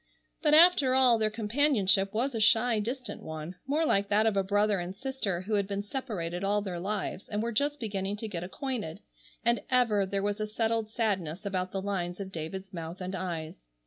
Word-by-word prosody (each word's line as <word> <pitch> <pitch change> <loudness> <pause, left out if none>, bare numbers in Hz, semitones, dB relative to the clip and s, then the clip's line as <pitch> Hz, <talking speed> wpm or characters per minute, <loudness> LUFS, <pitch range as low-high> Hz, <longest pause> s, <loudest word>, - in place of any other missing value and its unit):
But 300 -2 +5
after 310 -6 +6
all 250 -3 +5
their 215 -1 +2
companionship 210 -4 +3
was 250 +6 -1
a 225 - -2
shy, 225 +1 +4
distant 240 0 -4
one, 160 +3 -7
more 305 +4 +1
like 200 -8 +2
that 210 +2 +4
of 220 -2 +2
a 195 - +3
brother 205 +1 +2
and 175 +2 -5
sister 220 -7 -3
who 210 +4 -4
had 200 -2 +2
been 200 0 -3
separated 200 -7 -4
all 205 +1 +1
their 180 -4 -4
lives 195 0 -3
and 210 0 -1
were 235 - -1
just 290 +6 0
beginning 200 -2 -3
to 220 - -4
get 175 -5 -4
acquainted, 205 - -4 0.4
and 235 0 +3
ever 225 -6 +3
there 195 0 -1
was 205 +1 -1
a 215 - -1
settled 225 0 -1
sadness 195 -7 -2
about 185 -2 -2
the 195 -1 -3
lines 180 -3 -2
of 195 -1 -6
David's 190 +4 -6
mouth 170 +1 -6
and 185 0 -5
eyes. 165 - -5
205 Hz, 205 wpm, -29 LUFS, 185-230 Hz, 0.4 s, after